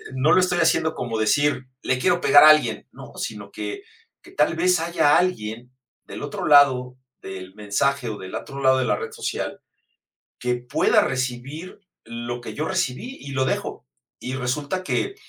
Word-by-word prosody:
no 140 +4 +2
lo - - +6
estoy 180 -1 +1
haciendo 160 -1 +2
como 115 -3 -3
decir: 145 +4 +1 0.2
"Le 130 0 0
quiero 175 +3 +2
pegar 145 +1 +7
a - - +10
alguien", 155 0 +3
¿no?, - - -12
sino - - -6
que 400 0 -6 0.4
que 350 - -16
tal 170 - +1
vez 180 0 +2
haya 165 -3 +3
alguien 125 -9 -2 0.3
del - - -8
otro 145 - -4
lado 130 -4 +5 0.3
del 95 -1 -8
mensaje 120 +6 -1
o 105 - -5
del 95 0 -9
otro 140 0 -6
lado 130 0 +4
de - - 0
la - - +1
red 455 0 -6
social 455 0 -4 0.8
que 125 0 0
pueda 120 0 +2
recibir 130 +7 -4 0.3
lo 120 +1 -6
que - - -8
yo 155 +2 -3
recibí, 185 - -2
y 140 - -9
lo 130 -1 +1
dejo. - - -3 0.3
Y 130 - -5
resulta 145 +8 -2
que 390 - -2
140 Hz, 175 wpm, -23 LUFS, 125-170 Hz, 0.8 s, a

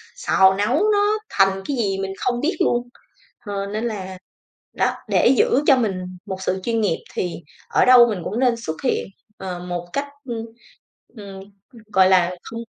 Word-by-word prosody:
xào 190 - +4
nấu 210 +6 +1 0.2
nó 415 +1 +2
thành 195 -1 +2
cái 275 - -2
gì 195 -4 0
mình 195 0 -3
không 245 -1 -1
biết 335 +4 0
luôn, 240 0 +1 0.6
ờ, 200 -1 -3
nên 215 +3 -4
là, 190 -5 -5 0.6
đó, - - +1 0.2
để - - +3
giữ 280 +4 +3
cho 270 -3 +6
mình 220 -6 0 0.3
một 190 0 -6
sự 190 0 -1
chuyên 230 -1 0
nghiệp 185 -6 +1 0.2
thì 180 - -3 0.3
ở - - +3
đâu 250 -1 +8
mình 200 -4 -3
cũng 215 - -3
nên 250 -2 +3
xuất 160 - -3
hiện, 255 - 0 0.3
ờ, 180 -2 -6
một 175 -1 -5
cách, 285 0 -2 0.2
ưm, 230 -3 -4 0.7
ừm, 195 -2 -9 0.5
gọi 190 0 +5
là, 180 -1 +4
không 230 - -7
205 Hz, 180 wpm, -21 LUFS, 190-245 Hz, 0.7 s, đâu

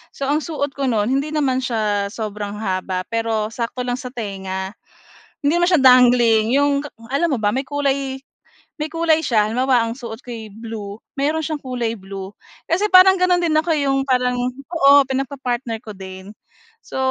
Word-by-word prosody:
So - - -5
ang 290 +2 +2
suot 295 -4 -3
ko 275 -1 -1
no'n 215 -4 +1
hindi 275 +3 0
naman 265 -4 +1
siya 210 -5 0
sobrang 210 -2 -5
haba 185 -2 -2
pero 225 -2 0
sakto 235 +2 -4
lang 245 0 -2
sa 255 - -6
tenga. 190 -4 -5 0.7
Hindi 285 +2 +2
naman 350 0 +3
siya 345 -6 +4
dangling 245 -3 +6
'yong 285 0 +3
ka - - -7 0.2
alam 335 +5 +2
mo - - +1
ba, 205 - +2
may 265 +2 -2
kulay 275 -1 -1 0.6
may 300 - -2
kulay 325 0 +2
siya. 220 -4 +3
Halimbawa, 250 +1 +2
ang 230 - -5
suot 235 -2 -7
ko'y 230 -3 -8
blue 220 -2 -7 0.2
mayroon 300 +3 +1
siyang 310 0 -3
kulay 240 -4 -3
blue, 195 0 -8 0.4
kasi 370 +6 +2
parang 375 +1 +8
gano'n 360 -1 +3
din 335 - +1
ako, 315 +2 +1
eh, 290 -2 0
'yong 270 0 +1
parang 250 -1 +1 0.3
oo, 285 -4 +6
pinagpa-partner 255 -3 -3
ko 220 - -10
din. 190 0 -9 0.5
So, - - -10
250 Hz, 180 wpm, -20 LUFS, 220-285 Hz, 0.7 s, parang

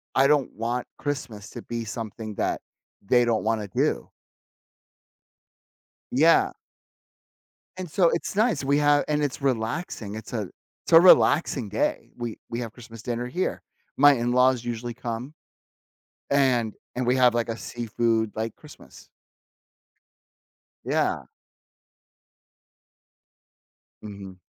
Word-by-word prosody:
I 135 +1 +5
don't 145 -2 +2
want 120 +3 -2
Christmas 125 -8 -4
to - - -8
be 115 -1 -4
something 110 -1 -6
that - - -1 0.4
they 120 +4 +3
don't 115 -2 +1
wanna 110 -2 -1
do." - - 0 2.0
Yeah. 160 +6 +4 1.2
And 185 -2 -6
so 175 0 +3
it's 170 - -2
nice, 220 -4 +2
we 140 +1 +2
have 145 0 +4
and 150 0 0
it's 140 0 -3
relaxing, 115 - -2
it's 110 - -9
a 105 -6 -3 0.4
it's - - -3
a 165 - +11
relaxing 145 - +5
day. - - -1
We 120 -2 -5
we 115 - -3
have 115 -3 -5
Christmas 115 -2 -12
dinner 120 +1 -3
here. 175 +9 -2 0.4
My 145 +1 +7
in-laws 125 0 +2
usually 120 0 -4
come. 120 +3 -5 1.0
And 125 -6 +2 0.2
and 125 0 -2
we 125 - +3
have 125 -2 +5
like 120 0 0
a 115 - -3
seafood, 115 -2 -1
like, 110 0 -3
Christmas. 150 -2 -15 1.8
Yeah. - - 0 2.8
Mhm. 100 -3 -9
120 Hz, 120 wpm, -25 LUFS, 115-140 Hz, 2.8 s, a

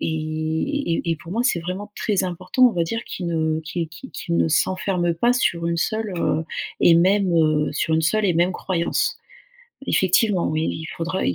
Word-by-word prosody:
et 160 - -2
et - - -3
pour 165 +2 -12
moi, 230 +4 0
c'est 180 -9 +2
vraiment 185 +5 -6
très 200 -4 0
important, 185 +8 +1
on - - -4
va 175 - 0
dire, 230 +8 -3
qu'ils 180 - -6
ne 160 -1 0
qu'ils 160 +1 -4
qu'ils 165 +12 -12
qu'ils 170 0 -3
ne - - +2
s'enferment 180 +1 +1
pas 235 +9 +2
sur 170 -9 0
une 170 - 0
seule, 215 +5 -1
heu, 160 -1 0 0.4
et 170 - +6
même, 190 +2 +3
heu, 155 -2 +2
sur 160 +2 0
une 160 - +2
seule 210 +7 +1
et 180 - +2
même 175 +2 +3
croyance. 175 -1 -1 0.7
Effectivement, 190 0 +2
oui, 155 +1 0
il 160 - -6
faudra 165 +3 -2
i 90 - +1
170 Hz, 195 wpm, -22 LUFS, 160-195 Hz, 0.7 s, et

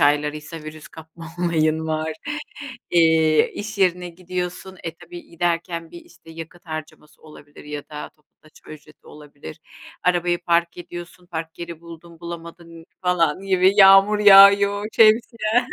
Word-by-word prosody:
aylarıysa 150 +2 0
virüs 155 0 -11
kapma 160 +1 -13
olayın 160 -2 0
var, 155 0 -2 0.8
eee, 160 -2 +3
iş 210 0 -7
yerine 180 -1 +1
gidiyorsun. 180 +1 -6
E 165 - -5
tabii 175 0 -12
giderken 170 0 -3
bir 170 - -11
işte 165 -1 -18
yakıt 165 +2 -11
harcaması 155 -1 -9
olabilir 150 -1 -15
ya 150 -1 -8
da 150 -1 -8
toplu 150 -2 -38
taşıma 155 0 -16
ücreti 155 0 -20
olabilir. 145 - -13 0.4
Arabayı 175 -1 +1
park 170 0 +1
ediyorsun. 175 0 -10
Park 165 -2 -7
yeri 170 -2 -8
buldun 170 0 -14
bulamadın 170 -1 -10 0.2
falan 180 -2 +1
gibi 190 -1 +3
yağmur 195 +1 +6
yağıyor, 200 0 +6
şemsiyen. 225 +1 +3
170 Hz, 135 wpm, -21 LUFS, 160-180 Hz, 0.8 s, yağmur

